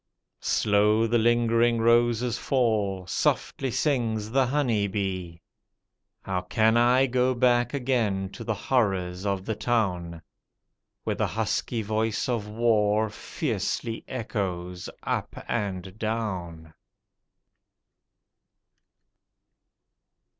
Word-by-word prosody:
Slow 105 Hz, +2 st, +3 dB
the 115 Hz, +1 st, +2 dB
lingering 120 Hz, 0 st, +3 dB
roses 120 Hz, +1 st, +3 dB
fall, 105 Hz, -8 st, 0 dB
softly 135 Hz, +8 st, 0 dB
sings 115 Hz, -5 st, 0 dB
the 135 Hz, 0 st, +3 dB
honey 120 Hz, -7 st, +1 dB
bee. 95 Hz, -4 st, -4 dB, 0.8 s
How 95 Hz, -1 st, -2 dB
can 110 Hz, +5 st, +2 dB
I 125 Hz, +3 st, +5 dB
go 130 Hz, 0 st, +1 dB
back 120 Hz, +1 st, +2 dB
again 115 Hz, -8 st, 0 dB
to -, -, -8 dB
the 110 Hz, -, -1 dB
horrors 95 Hz, -5 st, 0 dB
of 95 Hz, -1 st, -1 dB
the 110 Hz, -, -1 dB
town. 95 Hz, -7 st, -1 dB, 0.8 s
Where -, -, -1 dB
the -, -, 0 dB
husky 110 Hz, +1 st, -1 dB
voice 110 Hz, +1 st, -1 dB
of 115 Hz, -4 st, -2 dB
war 110 Hz, -1 st, +2 dB
fiercely 115 Hz, +2 st, -3 dB
echoes 90 Hz, -7 st, -4 dB
up -, -, -2 dB
and 95 Hz, -4 st, -3 dB
down? 95 Hz, -8 st, -4 dB
110 Hz, 95 wpm, -26 LUFS, 95-120 Hz, 0.8 s, I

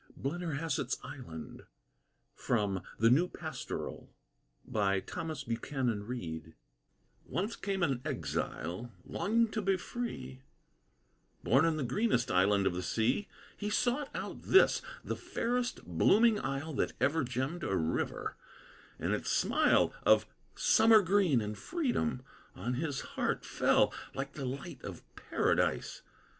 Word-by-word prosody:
BLENNERHASSETT'S 150 Hz, -3 st, -2 dB
ISLAND 80 Hz, -, -9 dB, 0.7 s
From 100 Hz, -6 st, 0 dB, 0.2 s
"The 115 Hz, +2 st, +5 dB
New 165 Hz, +8 st, +5 dB
Pastoral" 160 Hz, -3 st, -6 dB, 0.6 s
Once 110 Hz, +8 st, -1 dB, 2.1 s
came 195 Hz, -2 st, -2 dB
an 135 Hz, -6 st, +1 dB
exile, 90 Hz, +10 st, -3 dB
longing 225 Hz, +5 st, +1 dB
to 215 Hz, -, -1 dB
be 195 Hz, -1 st, +2 dB
free, 170 Hz, -, -5 dB, 1.0 s
Born 135 Hz, +7 st, +4 dB
in 165 Hz, -1 st, +2 dB
the 150 Hz, -, -1 dB
greenest 130 Hz, -, +1 dB
island 100 Hz, +2 st, +4 dB
of 90 Hz, -, +2 dB
the 90 Hz, -, -2 dB
sea; 115 Hz, -, +1 dB, 0.3 s
He 210 Hz, -, -3 dB
sought 250 Hz, +6 st, +1 dB
out -, -, -5 dB
this, 385 Hz, -, +5 dB, 0.2 s
the -, -, -2 dB
fairest 245 Hz, +1 st, -2 dB
blooming 210 Hz, -, +4 dB
isle 140 Hz, +4 st, -3 dB
That -, -, 0 dB
ever 145 Hz, +3 st, +2 dB
gemmed 130 Hz, +7 st, -2 dB
a 95 Hz, -, 0 dB
river; 80 Hz, -1 st, -2 dB, 0.6 s
and -, -, -1 dB
its -, -, -2 dB
smile, -, -, +3 dB
Of -, -, +5 dB, 0.3 s
summer 220 Hz, -2 st, +6 dB
green 180 Hz, -, +3 dB
and 105 Hz, 0 st, -3 dB
freedom, 245 Hz, -, -1 dB, 0.3 s
on 125 Hz, -, -2 dB
his 140 Hz, +1 st, -2 dB
heart -, -, -2 dB
Fell, -, -, +3 dB, 0.2 s
like 135 Hz, 0 st, -4 dB
the 140 Hz, -, -5 dB
light 130 Hz, +1 st, -6 dB
of -, -, -7 dB
Paradise. -, -, 0 dB
140 Hz, 120 wpm, -32 LUFS, 120-200 Hz, 2.1 s, summer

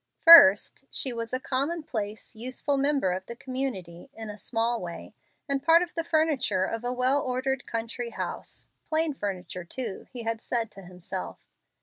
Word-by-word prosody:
First, 270 Hz, -, +8 dB
she 260 Hz, -, -1 dB
was 230 Hz, -1 st, -5 dB
a 255 Hz, -, -1 dB
commonplace, 260 Hz, -7 st, -3 dB
useful 255 Hz, +5 st, -2 dB
member 275 Hz, -8 st, +1 dB
of 185 Hz, +1 st, -4 dB
the 235 Hz, -, -7 dB
community, 255 Hz, -8 st, -5 dB
in 220 Hz, -1 st, -6 dB
a 205 Hz, -, -10 dB
small 230 Hz, +2 st, -1 dB
way, 170 Hz, -1 st, -8 dB, 0.3 s
and 275 Hz, -1 st, 0 dB
part 330 Hz, +4 st, +5 dB
of 355 Hz, -, -8 dB
the 330 Hz, -, -2 dB
furniture 310 Hz, -, +1 dB
of 230 Hz, +3 st, -4 dB
a 245 Hz, -, -1 dB
well 255 Hz, +3 st, +2 dB
ordered 260 Hz, +1 st, -2 dB
country 230 Hz, +1 st, -4 dB
house -, -, -6 dB, 0.2 s
plain 315 Hz, -1 st, +1 dB
furniture 185 Hz, -6 st, -5 dB
too, 215 Hz, +3 st, -4 dB
he 245 Hz, -3 st, -6 dB
had 225 Hz, 0 st, -2 dB
said 230 Hz, -3 st, -2 dB
to 195 Hz, -, -12 dB
himself. 180 Hz, +1 st, -7 dB
245 Hz, 165 wpm, -27 LUFS, 205-275 Hz, 0.3 s, First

